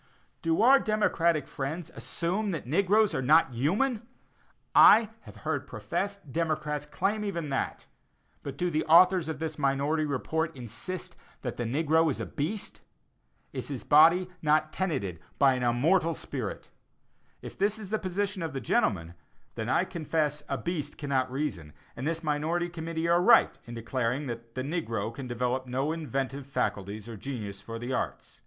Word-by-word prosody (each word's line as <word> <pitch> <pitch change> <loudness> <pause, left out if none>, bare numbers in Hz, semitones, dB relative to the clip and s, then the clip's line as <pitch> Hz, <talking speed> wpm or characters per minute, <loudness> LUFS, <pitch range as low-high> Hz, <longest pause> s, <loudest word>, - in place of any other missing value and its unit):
Do 165 +4 +2
our 270 +3 +7
democratic 175 - +1
friends 150 +5 -5
assume 170 - -2
that 165 -5 -3
the 125 - -9
negroes 200 +3 +3
are 130 - 0
not 150 0 +4
human? 210 - 0 0.7
I 220 0 +8
have - - -12
heard - - -1
professed 200 -7 -4
democrats 150 -2 -1
claim 210 +7 -1
even 170 -7 -3
that; 135 - -2 0.6
but 140 -1 -7
do 175 +2 0
the 155 0 +1
authors 175 +1 +6
of 160 - -3
this 155 0 -4
minority 145 +3 +1
report 160 +3 -2
insist 135 - -6 0.3
that - - -4
the 120 - -2
negro 160 +6 +2
is 135 - -2
a - - -2
beast? 190 +9 -4 0.7
Is - - -5
his 135 -4 -5
body 165 +5 +6
not 155 0 +2
tenanted 120 - -2 0.2
by 135 -1 +5
an 125 - -2
immortal 155 +8 +2
spirit? 125 -8 -5 0.7
If - - -8
this 205 +2 +1
is 210 -3 -9
the 220 - +1
position 195 +1 -2
of 160 -3 -3
the 135 - -2
gentlemen, 85 -9 0 0.4
then 110 +1 -4
I 170 - +3
confess 155 -4 -1
a - - -1
beast 155 -4 -4
cannot 135 -3 -1
reason, 115 - -3 0.2
and 130 - -4
this 165 +1 -2
minority 160 +3 0
committee 165 -1 -3
are 170 +1 +4
right 180 - +6
in 120 - -8
declaring 125 +4 -1
that 115 -2 -7
"the 130 - -2
negro 115 - -2
can 130 +2 -7
develop 125 +2 -1
no 135 +4 -1
inventive 135 -4 -3
faculties 105 -5 -2
or 115 -2 -7
genius 105 -5 -6
for 115 +2 -7
the 120 +3 -4
arts." - - -4
150 Hz, 165 wpm, -29 LUFS, 130-170 Hz, 0.7 s, I